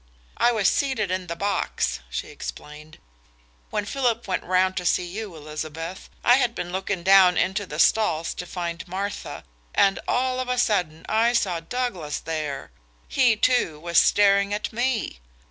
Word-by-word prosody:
"I 240 Hz, -, +4 dB
was 215 Hz, -4 st, +2 dB
seated 230 Hz, -9 st, 0 dB
in 185 Hz, -1 st, -2 dB
the 170 Hz, -, -4 dB
box," 200 Hz, -, -1 dB
she -, -, -4 dB
explained, 150 Hz, -, -9 dB, 0.7 s
"when 210 Hz, -, -2 dB
Philip 240 Hz, -2 st, -1 dB
went 185 Hz, -, -1 dB
round 185 Hz, +1 st, +2 dB
to 180 Hz, -, -2 dB
see 180 Hz, -, +2 dB
you, 195 Hz, +1 st, -6 dB
Elizabeth. 155 Hz, +3 st, -7 dB
I 245 Hz, +1 st, +6 dB
had 245 Hz, -3 st, 0 dB
looking 185 Hz, +1 st, -3 dB
down 190 Hz, -1 st, +6 dB
into 190 Hz, +2 st, 0 dB
the -, -, -6 dB
stalls 165 Hz, -7 st, +2 dB
to 180 Hz, -, -7 dB
find 170 Hz, 0 st, -5 dB
Martha, 195 Hz, +3 st, -5 dB, 0.3 s
and 195 Hz, -1 st, +4 dB
all 255 Hz, 0 st, +1 dB
of 255 Hz, -1 st, -3 dB
a 250 Hz, -, 0 dB
sudden 180 Hz, -9 st, 0 dB
I 230 Hz, +2 st, +2 dB
saw 190 Hz, -8 st, +1 dB
Douglas 180 Hz, -6 st, -3 dB
there. 150 Hz, -, -4 dB, 0.4 s
He, 250 Hz, -4 st, +3 dB
too, 215 Hz, -9 st, +1 dB
was 170 Hz, +1 st, +3 dB
staring 200 Hz, 0 st, +4 dB
at 210 Hz, -, -4 dB
me. 240 Hz, -, -1 dB
190 Hz, 160 wpm, -24 LUFS, 170-225 Hz, 0.7 s, I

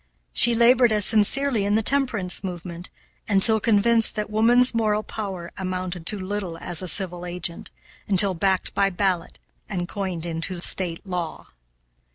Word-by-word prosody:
She 235 Hz, -1 st, +5 dB
labored 240 Hz, +1 st, +3 dB
as 210 Hz, -2 st, +3 dB
sincerely 230 Hz, +2 st, +2 dB
in 205 Hz, +1 st, -1 dB
the 220 Hz, -, 0 dB
temperance 230 Hz, -10 st, 0 dB
movement, 175 Hz, -1 st, -8 dB, 0.4 s
until 210 Hz, +2 st, +6 dB
convinced 225 Hz, +1 st, +1 dB
that 210 Hz, 0 st, -5 dB
woman's 240 Hz, +4 st, +3 dB
moral 215 Hz, -2 st, -1 dB
power 195 Hz, -5 st, -7 dB
amounted 185 Hz, -2 st, -6 dB
to 210 Hz, -, 0 dB
little 190 Hz, -3 st, -6 dB
as 175 Hz, 0 st, -3 dB
a 185 Hz, -, -6 dB
civil 180 Hz, -1 st, -2 dB
agent, 175 Hz, -1 st, -5 dB, 0.4 s
until 195 Hz, -1 st, +5 dB
backed 190 Hz, +2 st, -2 dB
by 195 Hz, 0 st, +1 dB
ballot 185 Hz, -2 st, -3 dB, 0.3 s
and 175 Hz, -3 st, -4 dB
coined 185 Hz, -4 st, -6 dB
into 170 Hz, +2 st, -5 dB
State 175 Hz, 0 st, +2 dB
law. 180 Hz, -4 st, -6 dB
195 Hz, 150 wpm, -22 LUFS, 180-220 Hz, 0.4 s, until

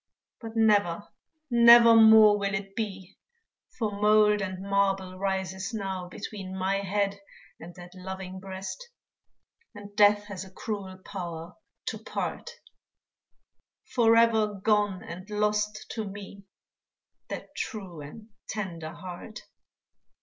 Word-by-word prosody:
But 225 Hz, -1 st, -7 dB
never, 205 Hz, -5 st, +2 dB, 0.4 s
nevermore 225 Hz, -3 st, +8 dB
will 200 Hz, +1 st, -1 dB
it 195 Hz, -1 st, -6 dB
be, 195 Hz, -5 st, -5 dB, 0.6 s
For 220 Hz, -4 st, -1 dB
mould 210 Hz, 0 st, +4 dB
and 185 Hz, -1 st, -4 dB
marble 195 Hz, -2 st, 0 dB
rises 190 Hz, +2 st, -2 dB
now 190 Hz, -3 st, -4 dB
Between 190 Hz, -1 st, -7 dB
my 190 Hz, +1 st, 0 dB
head 200 Hz, 0 st, -1 dB, 0.4 s
and 175 Hz, +1 st, -11 dB
that 180 Hz, 0 st, -12 dB
loving 190 Hz, 0 st, -7 dB
breast; 190 Hz, -, -7 dB, 0.9 s
And 205 Hz, 0 st, -11 dB
death 205 Hz, -1 st, +5 dB
has 200 Hz, -3 st, -7 dB
a 190 Hz, -, -12 dB
cruel 195 Hz, -1 st, -6 dB
power 170 Hz, -4 st, -6 dB, 0.3 s
to -, -, -4 dB
part -, -, -4 dB, 1.4 s
Forever 230 Hz, -2 st, +4 dB
gone 205 Hz, -1 st, +1 dB
and 185 Hz, +4 st, -9 dB
lost 210 Hz, 0 st, -1 dB
to 220 Hz, -, -3 dB
me 200 Hz, 0 st, -9 dB, 0.8 s
That -, -, -7 dB
true 190 Hz, -, -6 dB
and 210 Hz, +10 st, -11 dB, 0.2 s
tender 170 Hz, -6 st, -5 dB
heart. 185 Hz, +4 st, -9 dB
200 Hz, 115 wpm, -27 LUFS, 190-210 Hz, 1.4 s, nevermore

